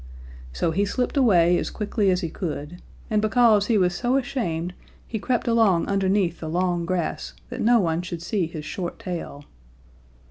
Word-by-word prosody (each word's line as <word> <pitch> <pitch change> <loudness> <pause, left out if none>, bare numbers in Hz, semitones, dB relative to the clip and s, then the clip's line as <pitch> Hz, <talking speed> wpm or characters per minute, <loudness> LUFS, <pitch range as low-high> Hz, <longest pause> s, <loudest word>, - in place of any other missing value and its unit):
So 115 - -1
he 195 +5 +1
slipped 250 +7 -1
away 180 -10 +4
as - - -3
quickly 210 -1 0
as 180 0 +2
he 165 - -3
could, 155 0 -5 0.3
and 215 -1 +2
because 215 -1 +4
he 230 - +3
was 180 -2 +2
so 245 +7 +1
ashamed 180 -10 -2 0.3
he 220 - -4
crept 245 +4 -1
along 225 -7 +3
underneath 195 -3 +1
the 160 - -5
long 175 0 0
grass 175 - -2 0.2
that - - -5
no 235 +1 +5
one 165 -3 0
should 175 -2 -6
see 185 -2 -1
his 155 -2 -7
short 175 +2 -5
tail. 165 -5 -6
185 Hz, 175 wpm, -24 LUFS, 170-215 Hz, 0.3 s, no